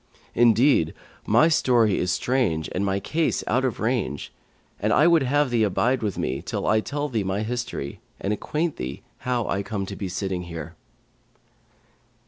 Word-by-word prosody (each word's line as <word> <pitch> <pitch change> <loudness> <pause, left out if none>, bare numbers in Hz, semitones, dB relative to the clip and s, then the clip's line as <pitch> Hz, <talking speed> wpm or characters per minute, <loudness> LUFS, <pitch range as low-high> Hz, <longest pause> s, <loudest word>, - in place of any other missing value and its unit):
Indeed, 115 - +4 0.3
my 115 +9 +5
story 120 - +3
is 90 - 0
strange 105 -9 0
and 95 - -1
my 100 0 0
case 160 +9 0
out 130 +4 +1
of 130 -3 -1
range, 110 - -2 0.5
and - - 0
I 150 - +5
would 170 -2 +5
have 140 +1 +1
thee 120 -2 +2
abide 115 +5 +2
with 105 -4 -2
me, - - -2
till - - -4
I 110 - +3
tell 145 +6 -3
thee 115 -7 -1
my 95 +2 -1
history 115 - -4 0.2
and 100 - -1
acquaint 155 +9 -2
thee 65 +2 -5 0.2
how 125 -3 -1
I 100 - 0
come 100 -1 -3
to 100 - -7
be 95 -1 -4
sitting 95 -1 -2
here.'" 85 -1 -7
110 Hz, 170 wpm, -24 LUFS, 95-130 Hz, 0.5 s, my